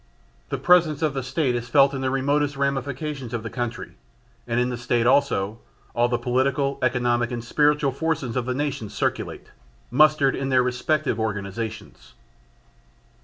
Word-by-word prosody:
The - - -2
presence 165 -4 +3
of 150 -3 +1
the 135 - -2
State 130 +1 0
is 120 0 -4
felt 140 -1 +5
in 135 - -3
the 130 - 0
remotest 140 +2 0
ramifications 140 -1 -2
of 110 - -4
the 115 - -6
country. 120 -2 -4 0.6
And 120 0 0
in 125 0 +1
the - - -2
State 120 0 0
also, 120 -6 +2 0.3
all 120 +1 +2
the 120 - +1
political, 135 +3 0
economic 120 -2 +1
and 120 -2 -4
spiritual 145 +2 +2
forces 140 -4 -2
of 125 -1 -1
the 125 - -1
nation 140 -6 -3
circulate, - - -3 0.4
mustered 150 0 +4
in 135 0 -3
their 130 -1 +4
respective 135 +3 0
organisations. 110 +1 -5
130 Hz, 160 wpm, -24 LUFS, 120-140 Hz, 0.6 s, felt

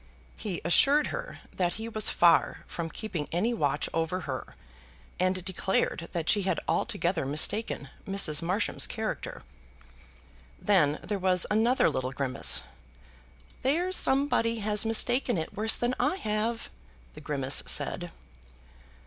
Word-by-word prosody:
He 195 -5 -5
assured 280 - +4
her - - -6
that 175 -2 0
he 220 +1 -5
was 215 -2 +2
far 170 -2 +3
from 165 -1 -5
keeping 170 -5 -5
any 210 +8 0
watch 145 -11 0
over 165 +3 -1
her, 130 -5 -6 0.6
and 185 0 0
declared 190 -2 -1
that 170 -3 -3
she 205 - +3
had 190 - 0
altogether 190 -7 0
mistaken 150 +4 -1 0.2
Mrs. 190 -7 +1
Marsham's 185 +6 0
character. - - -5 1.2
Then 155 -7 +2
there 205 -1 -3
was 185 -1 +3
another 230 +5 +3
little 130 0 -2
grimace. 130 -1 +2 1.0
"There's 345 +8 +1
somebody 265 -6 +2
has 210 0 0
mistaken 240 +1 +2
it 160 - -5
worse 220 +2 +3
than 240 +1 -1
I - - +1
have," 220 - -2 0.4
the - - -11
grimace 135 -2 0
said. - - 0
195 Hz, 130 wpm, -28 LUFS, 165-225 Hz, 1.2 s, assured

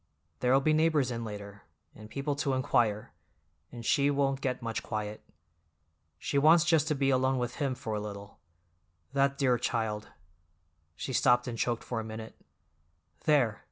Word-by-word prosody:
There'll 130 +2 +3
be 155 +2 +3
neighbors 155 -5 +2
in 115 -1 -3
later, 100 -2 -8 0.3
and 110 0 -12
people 140 +4 -2
to 140 -2 0
inquire, 120 -5 +1 0.6
and 120 -1 -8
she 140 +3 +3
won't 135 -1 +1
get 130 -2 -1
much 115 -1 -2
quiet. 105 -1 -4 1.0
She 140 - 0
wants 160 +3 +6
just 160 -3 +3
to 155 - +1
be 135 0 +2
alone 130 0 +2
with 120 -1 -3
him 135 -3 -1
for 125 -4 -5
a 105 - -1
little. 100 -1 -8 0.7
That 140 0 +2
dear 125 -4 +2
child—" 110 -3 -2 0.9
she 130 - -5
stopped 125 0 +3
and 120 - -3
choked 120 0 -1
for 120 - -3
a - - -3
minute. 110 0 -8 0.9
"There! 135 -9 +3
125 Hz, 160 wpm, -30 LUFS, 110-140 Hz, 1.0 s, wants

